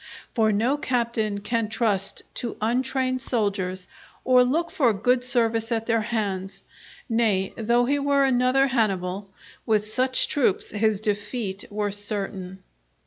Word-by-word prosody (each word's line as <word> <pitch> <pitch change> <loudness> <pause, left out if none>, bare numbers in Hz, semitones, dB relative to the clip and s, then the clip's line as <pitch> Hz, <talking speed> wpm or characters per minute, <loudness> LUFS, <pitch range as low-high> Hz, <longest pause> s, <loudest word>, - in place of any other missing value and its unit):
For 220 -3 +3
no 235 +7 +1
captain 235 -6 -1
can 225 +1 -1
trust 210 -4 -1
to 235 - -4
untrained 255 +3 0
soldiers 195 -6 -2 0.4
or 255 -1 +6
look 320 +7 0
for 245 -7 +3
good 245 +5 +1
service 230 -2 0
at 225 -1 0
their 230 -1 +2
hands; 200 -4 -3 0.4
nay, 220 -5 +1
though 235 +2 +2
he 285 +3 +1
were 280 0 +3
another 260 +1 +3
Hannibal, 200 -6 -1 0.4
with 215 -1 +2
such 255 +4 +1
troops 260 -10 0
his 215 -1 +1
defeat 205 -1 -2
were 205 0 -2
certain. 195 -2 -5
225 Hz, 135 wpm, -25 LUFS, 205-250 Hz, 0.4 s, or